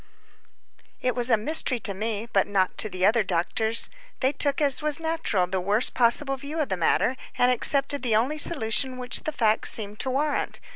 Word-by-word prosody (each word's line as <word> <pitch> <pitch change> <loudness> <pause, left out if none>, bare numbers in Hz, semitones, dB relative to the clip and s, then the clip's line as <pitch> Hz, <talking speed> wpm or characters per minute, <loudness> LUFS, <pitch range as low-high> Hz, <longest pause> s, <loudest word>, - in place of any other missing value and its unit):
t 255 - +1
was 245 0 0
a 230 - +4
mystery 255 +1 +1
to 205 -3 -3
me, 215 +2 -4
but 195 - +2
not 195 -2 0
to 215 - -1
the 185 -1 -1
other 220 +2 +3
doctors. 195 +5 0 0.3
They 260 0 +1
took, 285 -1 0
as 285 -2 +3
was 300 +1 +1
natural, 320 - -1
the 185 +1 -3
worst 205 +6 +2
possible 270 +3 +2
view 290 +4 -6
of 300 - -2
the 190 - -1
matter, 180 +8 +1 0.2
and 250 0 +3
accepted 275 +3 +1
the 235 -4 +1
only 265 +8 0
solution 255 -3 +1
which 250 0 -3
the 310 - -2
facts 220 -6 +1
seem 210 -2 +3
to 260 - -2
warrant. 285 +3 -2
245 Hz, 195 wpm, -24 LUFS, 210-280 Hz, 0.3 s, a